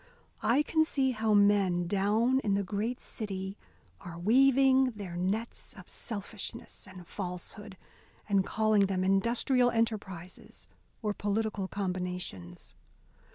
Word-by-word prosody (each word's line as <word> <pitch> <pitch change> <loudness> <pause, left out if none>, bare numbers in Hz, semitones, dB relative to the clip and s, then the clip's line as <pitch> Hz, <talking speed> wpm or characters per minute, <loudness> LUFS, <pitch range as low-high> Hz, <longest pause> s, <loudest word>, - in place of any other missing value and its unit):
I 270 +6 +3
can 315 +1 +2
see 270 -4 +1
how 220 -2 +1
men 200 -4 +4
down 210 +7 +2
in 205 -6 0
the 200 - 0
great 215 +6 -2
city 195 -2 -5 0.4
are 170 -1 -9
weaving 260 +5 +4
their 190 -4 -7
nets 200 +6 -3
of - - -13
selfishness 215 0 -7
and 185 -2 -11
falsehood, 190 +2 -7 0.5
and 200 -2 +3
calling 215 -1 +2
them 185 -1 -1
industrial 235 +6 +2
enterprises 205 -6 -4 0.4
or 210 -1 0
political 205 -1 -1
combinations. 180 - -4
205 Hz, 115 wpm, -30 LUFS, 190-230 Hz, 0.5 s, men